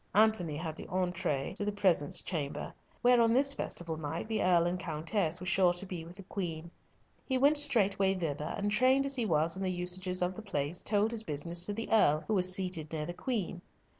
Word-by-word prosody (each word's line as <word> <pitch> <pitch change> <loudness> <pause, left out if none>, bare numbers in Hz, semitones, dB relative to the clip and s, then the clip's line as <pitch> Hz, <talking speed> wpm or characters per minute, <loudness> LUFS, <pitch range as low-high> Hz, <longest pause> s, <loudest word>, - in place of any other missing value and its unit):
Antony 205 -8 +3
had 160 -1 -4
the - - -7
entree 180 -7 -1
to 205 - -4
the 210 - 0
presence 185 -8 +1
chamber, 155 -6 -4 0.3
where 245 0 +6
on 230 0 +4
this 275 +2 +4
festival 165 - -2
night 160 +5 -4
the 220 -1 -1
Earl 175 -2 +4
and 180 +1 -1
Countess 165 +1 -1
were 180 - -7
sure 185 -1 +3
to 175 +2 -6
be 180 -3 -6
with 170 +2 -12
the 195 - -10
Queen. 170 -4 -5 0.5
He 260 - -1
went 285 +4 +4
straightway 200 -9 +2
thither, 150 -4 -3
and 205 0 -1
trained 260 +5 +4
as 275 - 0
he 240 -4 -1
was 160 0 +2
in 190 - -6
the 190 - 0
usages 180 +1 -1
of 180 +1 -1
the 220 - -8
place, 160 -5 -3
told 210 +1 +1
his 230 -2 -2
business 170 0 0
to 205 - -2
the 225 +2 -4
Earl, 155 -9 +4
who 220 - 0
was 185 -2 +3
seated 180 -5 -2
near 155 -2 -3
the 175 - -5
Queen. 195 -6 -3
185 Hz, 220 wpm, -31 LUFS, 165-210 Hz, 0.5 s, where